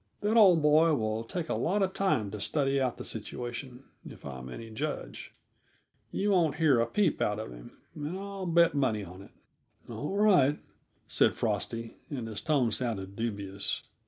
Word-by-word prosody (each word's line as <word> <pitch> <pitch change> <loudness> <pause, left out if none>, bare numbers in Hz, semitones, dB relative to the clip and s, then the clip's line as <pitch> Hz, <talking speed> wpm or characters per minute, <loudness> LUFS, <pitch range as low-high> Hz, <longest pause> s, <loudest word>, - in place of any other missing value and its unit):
That 210 +2 +1
old 185 -8 +7
boy 155 +1 +5
will 110 -2 -1
take 165 +8 -4
a - - -1
lot 195 +4 +1
of 190 0 -1
time 110 - 0
to 105 - -6
study 140 0 +1
out 125 -2 0
the - - -6
situation, 120 +3 -5 0.2
if - - -12
I'm 65 -2 -7
any 115 - -8
judge. 120 - -5 0.8
You 205 +1 0
won't 165 -7 +3
hear 155 -6 +4
a 115 - +2
peep 205 -6 +1
out 105 - +1
of 110 - -6
him, - - -12 0.2
and 150 +4 -5
I'll 195 -1 -5
bet 170 0 +4
money 125 -7 +1
on 90 +1 -10
it." 100 - -13 0.6
"All 190 +7 -4
right," 180 -9 +5 0.5
said - - +3
Frosty, 115 0 -2
and 125 -6 -4
his 110 -2 -5
tone 135 -7 +2
sounded 100 -5 -2
dubious. 100 -3 -3
135 Hz, 175 wpm, -30 LUFS, 110-165 Hz, 0.8 s, old